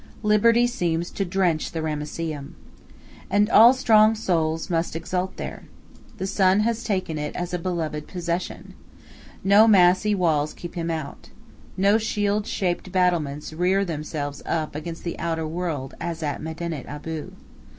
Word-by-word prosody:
Liberty 230 +3 +4
seems 175 -8 -1
to 195 - -2
drench 175 -4 0
the 160 -1 -3
Ramesseum. 150 -1 -4 0.7
And 205 +2 +2
all 230 +3 +9
strong 225 -4 +4
souls 165 -6 0
must 165 -3 -1
exult 180 +3 -3
there. - - -6 0.5
The 190 - -3
sun 190 +1 +3
has 230 +1 0
taken 185 -8 -2
it 150 0 -4
as 180 0 -4
a 180 - -1
beloved 165 -4 -3
possession. 175 -1 -4 0.7
No 205 +3 +6
massy 190 +1 +5
walls 155 -5 +1
keep 175 - -8
him 170 -1 -3
out. 160 -4 -5 0.5
No 200 +3 +4
shield 210 -1 -1
shaped 185 -1 -2
battlements 165 -6 0
rear 185 +4 +1
themselves 150 -3 -4
up 155 -2 -1
against 165 +2 -6
the 170 - -5
outer 165 -1 -2
world 160 -5 -4
as 170 -1 -4
at 145 -2 -2
Medinet 160 -2 -5
Abu. 150 +2 -6
175 Hz, 145 wpm, -24 LUFS, 160-195 Hz, 0.7 s, all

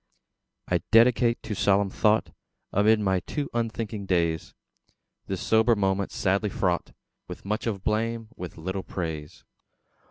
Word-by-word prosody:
I - - +2
dedicate 115 +1 +4
to 110 - -4
solemn 100 0 +2
thought 110 +1 +2 0.4
Amid 105 +2 +4
my 95 -2 +2
too 145 - -4
unthinking 110 -3 -3
days, 85 -3 0 0.7
This - - -3
sober 110 +1 +4
moment, 95 -1 0
sadly 100 +2 0
fraught 90 -3 -1 0.3
With - - -9
much 105 +4 -2
of 100 -4 -3
blame, 115 +1 -1
with 90 -2 -8
little 95 +4 -3
praise. 80 -6 -6
100 Hz, 130 wpm, -26 LUFS, 95-110 Hz, 0.7 s, dedicate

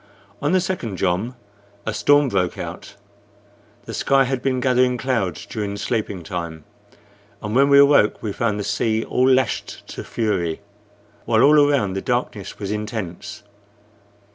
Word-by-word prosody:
On 145 - +1
the 185 - +4
second 175 - -3
jom 95 +8 -1 0.5
a 110 - -2
storm 145 +2 +4
broke 90 -5 0
out. - - -7 0.9
The - - -7
sky 135 0 +3
had 130 -1 -2
been 130 -1 0
gathering 125 0 +2
clouds 115 - -2
during 100 -2 -4
sleeping 105 -5 -3
time, 85 -4 -5 0.8
and 105 +2 -4
when 140 +2 +5
we 140 - +6
awoke 140 -6 +5
we 105 -3 -3
found 105 -2 -1
the - - -2
sea 110 +2 0
all 130 +1 +2
lashed 130 -1 0
to - - -7
fury, 100 -6 -2 0.6
while 110 -1 +3
all 150 +2 +6
around 105 -10 +1
the 95 - -3
darkness 120 -5 -3
was 100 -1 -4
intense. 105 -4 -5
110 Hz, 150 wpm, -21 LUFS, 100-130 Hz, 0.9 s, we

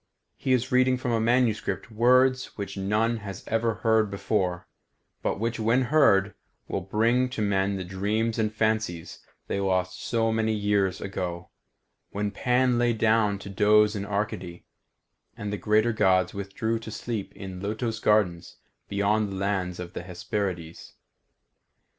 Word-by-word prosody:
He 130 - -2
is 125 -2 +1
reading 130 0 +4
from 125 -1 -2
a 115 - +2
manuscript 120 -1 0
words 130 +3 +3
which 100 -1 -5
none 105 +4 0
has 100 -3 -8
ever 115 0 0
heard 110 -2 +3
before, 95 -2 -1 0.6
but - - -1
which 115 +1 -2
when 115 +4 +2
heard 100 -10 +4 0.3
will 95 - -2
bring 115 +7 +1
to 125 - -6
men 100 -1 +1
the 95 - -4
dreams 105 +5 -1
and 110 -1 +1
fancies 110 -6 -1 0.3
they - - -2
lost 95 -1 -1
so 115 -1 +1
many 110 -1 0
centuries 100 -2 +1
ago, 90 -3 -5 0.6
when 105 0 -2
Pan 125 +2 +2
lay 120 -1 +3
down 110 -2 +2
to 100 - -10
doze 105 +1 +4
in 100 - -3
Arcady, 100 -4 -4 0.7
and 105 0 -4
the - - -1
greater 110 +3 +2
Gods 95 -4 +2
withdrew 100 +3 -2
to 110 - -9
sleep 110 -2 -4
in 95 -2 -8
lotos 110 +2 -3
gardens 100 -6 +1 0.3
beyond 100 +1 +1
the 95 - -5
lands 95 -2 -2
of 90 -1 -7
the - - -5
Hesperides. 90 -1 -5
105 Hz, 150 wpm, -26 LUFS, 95-115 Hz, 0.7 s, reading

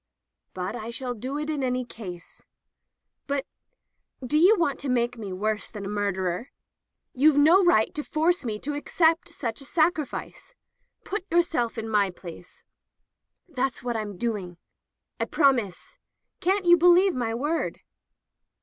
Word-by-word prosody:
"But 185 +4 -3
I 225 -1 -6
shall 245 +1 -3
do 255 +5 -5
it 300 0 -3
in 305 -3 -2
any 250 0 -1
case." 180 -7 -10 0.8
"But 280 -1 -1 0.4
— 260 - -16
do 300 +5 +2
you 380 +7 +7
want 300 -6 0
to 280 - -3
make 240 -1 +1
me 210 -5 -7
worse 215 +3 -2
than 205 -2 -7
a - - -4
murderer? 200 +1 -2 0.6
You've 290 +3 +4
no 330 +7 +6
right 220 -12 +3
to 300 - -4
force 325 +4 +1
me 220 -4 -3
to 295 - -3
accept 325 +3 +1
such 245 -7 -4
a - - -7
sacrifice. 310 -1 -1 0.5
Put 395 -1 -5
yourself 325 -9 +1
in 225 0 -4
my 210 -3 +2
place." 175 -1 -11 0.8
"That's 270 -6 -2
what 240 -1 -2
I've 215 -1 -2
been 200 -3 -9
doing." 195 -5 -3 0.3
" - - -55
I - - +1
promise— 250 - 0 0.4
Can't 380 +1 +1
you 345 0 +7
believe 355 +2 +5
my 230 -3 -2
word 295 +7 -2
255 Hz, 160 wpm, -26 LUFS, 215-315 Hz, 0.8 s, you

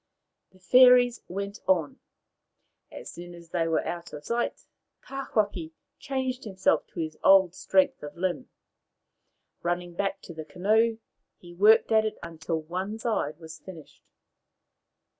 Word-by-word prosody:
The 190 - -23
fairies 250 +3 +6
went 200 +3 -5
on. 170 -6 +1 0.9
As - - -9
soon 175 0 -10
as 170 -1 -15
they 165 -2 0
were 165 - 0
out 175 0 -6
of 150 - -9
sight 235 +1 -2 0.4
Tawhaki 205 -11 -2 0.3
changed 260 -1 -3
himself 190 -3 0
to - - -10
his 155 -1 -4
old 190 -3 +6
strength 185 0 +1
of 150 +2 -9
limb. 185 +7 -2 1.1
Running 175 0 -2
back 195 +3 -2
to 170 - -9
the 160 -1 -7
canoe, 220 +7 +1 0.4
he 175 -1 -14
worked 210 +6 +5
at 220 -1 +5
it 215 - -3
until 160 0 -4
one 185 +6 -4
side 215 -10 -2
was 160 -1 -11
finished. 170 -5 -13
185 Hz, 140 wpm, -27 LUFS, 170-220 Hz, 1.1 s, fairies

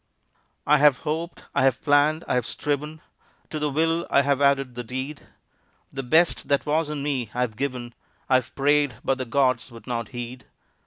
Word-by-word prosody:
I 150 +1 +5
have 145 -3 +6
hoped, 160 +3 -3
I - - +2
have 130 -1 +2
planned, 150 +3 +3
I - - 0
have 125 -2 0
striven, 150 +2 -3 0.5
To 155 - -3
the 150 0 0
will 165 +3 0
I 140 - +4
have 140 0 +1
added 135 -2 +2
the 120 0 -5
deed; 130 +5 -6 0.6
The 135 - -4
best 160 +6 +2
that 140 -1 +1
was 155 +1 +1
in 150 -2 -4
me 135 -6 -2
I've 125 -3 -1
given, 125 -2 -4 0.3
I 130 - +5
have 130 -1 -5
prayed, 145 -2 +2
but 135 0 +1
the 130 - -2
gods 130 -1 +1
would 115 -2 -13
not 115 -2 -3
heed. 120 -1 -7
140 Hz, 190 wpm, -24 LUFS, 125-150 Hz, 0.6 s, have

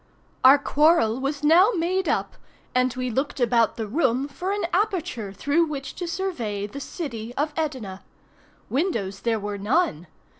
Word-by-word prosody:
Our 265 +2 +9
quarrel 285 -5 +3
was 280 +2 -3
now 340 +7 +6
made 365 +3 0
up, - - -1 0.4
and 255 0 +2
we 255 -1 -2
looked 270 +5 -2
about 235 -2 +3
the 225 - -2
room 260 +2 +1
for 360 +7 -4
an 410 -2 -1
aperture 355 - -1
through 285 - +1
which 275 -3 -5
to 350 - -4
survey 245 - -3
the 240 +7 -7
city 245 -7 -6
of 295 +2 -1
Edina. 255 -12 -4 0.7
Windows 225 - -1
there 230 -2 0
were 205 0 -4
none. 205 - 0
270 Hz, 155 wpm, -24 LUFS, 225-330 Hz, 0.7 s, Our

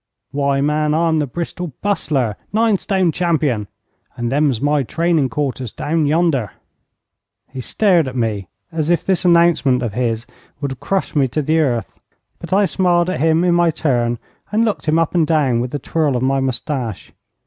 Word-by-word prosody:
Why, 140 -1 0
man, 150 +1 +1
I'm 165 -1 +2
the 150 - -1
Bristol 170 +2 -5
Bustler, 140 - 0 0.2
nine 220 -2 +2
stone 190 -4 +1
champion, 150 - 0 0.5
and 120 0 -3
them's 140 -4 +2
my 145 +2 +2
training 160 +1 +1
quarters 130 -2 -3
down 155 0 -1
yonder.' 150 - +1 1.0
He 130 -1 -6
stared 175 - +2
at 130 - -6
me 110 -6 -1 0.2
as 160 -1 -2
if 175 - +1
this 190 -1 0
announcement 170 -7 +4
of 115 -4 -3
his 115 -1 -1 0.3
would 140 -2 -3
have 130 - -7
crushed 195 -4 -2
me 140 -3 +3
to 150 +5 -2
the 160 +3 +2
earth, 120 -8 0 0.5
but 170 - -9
I 200 +2 +4
smiled 180 -2 +2
at - - -3
him 160 +2 +3
in 180 -1 +3
my 175 -1 +3
turn, 120 -6 0 0.3
and 220 +2 +2
looked 215 -6 -2
him 155 +1 +3
up 165 -1 +1
and 165 -3 +2
down, 145 -7 +2
with 125 +1 -3
a - - +1
twirl 145 0 0
of 125 - -1
my 135 +1 +2
moustache. 130 -3 -3
150 Hz, 180 wpm, -18 LUFS, 130-170 Hz, 1.0 s, announcement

